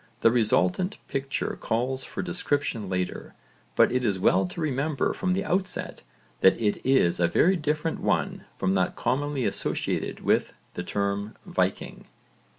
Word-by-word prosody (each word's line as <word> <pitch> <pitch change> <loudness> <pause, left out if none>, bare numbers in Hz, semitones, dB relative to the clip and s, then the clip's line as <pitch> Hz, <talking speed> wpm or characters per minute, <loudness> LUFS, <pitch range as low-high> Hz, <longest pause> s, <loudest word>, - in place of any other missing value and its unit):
The 115 - +6
resultant 115 - +2
picture 135 +1 -2
calls 130 +4 -1
for - - -5
description 145 - -1
later, 90 -1 -3 0.4
but - - +5
it 125 0 0
is 105 -5 +1
well 95 0 +3
to 90 - -8
remember 145 -1 0
from 185 -2 0
the 195 +1 -1
outset 185 +1 -2 0.4
that 95 - +5
it 105 -3 0
is 130 -11 +3
a 85 - +4
very 180 - +3
different 155 0 -1
one - - -1
from 95 0 +1
that 95 -1 +1
commonly 140 -1 -1
associated - - -2
with - - +1 0.2
the - - -4
term 100 +1 -2
'Viking.' - - -2
130 Hz, 150 wpm, -26 LUFS, 100-150 Hz, 0.4 s, The